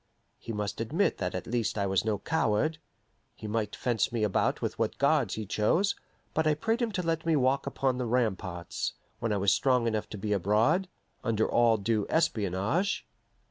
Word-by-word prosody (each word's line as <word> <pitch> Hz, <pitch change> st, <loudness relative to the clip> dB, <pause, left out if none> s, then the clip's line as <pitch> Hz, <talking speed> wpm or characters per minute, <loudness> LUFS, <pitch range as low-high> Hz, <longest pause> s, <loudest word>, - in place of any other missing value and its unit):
He 115 Hz, -, -7 dB
must 105 Hz, 0 st, -3 dB
admit 160 Hz, -, 0 dB
that 90 Hz, -2 st, -2 dB
at 90 Hz, -, -4 dB
least 115 Hz, -2 st, -1 dB
I 100 Hz, -, +1 dB
was 95 Hz, -1 st, +1 dB
no 110 Hz, -2 st, 0 dB
coward. 155 Hz, +4 st, 0 dB, 0.6 s
He -, -, -10 dB
might 105 Hz, -1 st, -2 dB
fence 120 Hz, -2 st, 0 dB
me 115 Hz, -2 st, -1 dB
about 105 Hz, -3 st, +1 dB
with -, -, -3 dB
what -, -, 0 dB
guards -, -, +2 dB
he 110 Hz, -, -4 dB
chose, 135 Hz, -, +2 dB, 0.4 s
but 160 Hz, 0 st, +1 dB
I 155 Hz, -, +3 dB
prayed 225 Hz, +9 st, 0 dB
him 235 Hz, -2 st, 0 dB
to 180 Hz, -, -1 dB
let 165 Hz, -1 st, -1 dB
me 165 Hz, -1 st, +2 dB
walk 135 Hz, 0 st, +2 dB
upon 130 Hz, -2 st, 0 dB
the 125 Hz, -, -1 dB
ramparts, 95 Hz, -7 st, -1 dB, 0.3 s
when 115 Hz, -, -1 dB
I 105 Hz, -, +1 dB
was 100 Hz, 0 st, +3 dB
strong 125 Hz, -3 st, +2 dB
enough 110 Hz, -2 st, -1 dB
to 105 Hz, -, -6 dB
be 105 Hz, +1 st, -1 dB
abroad, 110 Hz, -, +2 dB, 0.4 s
under 110 Hz, -1 st, +1 dB
all 115 Hz, -2 st, +4 dB
due 105 Hz, 0 st, 0 dB
espionage. 130 Hz, -, 0 dB
115 Hz, 190 wpm, -29 LUFS, 105-150 Hz, 0.6 s, all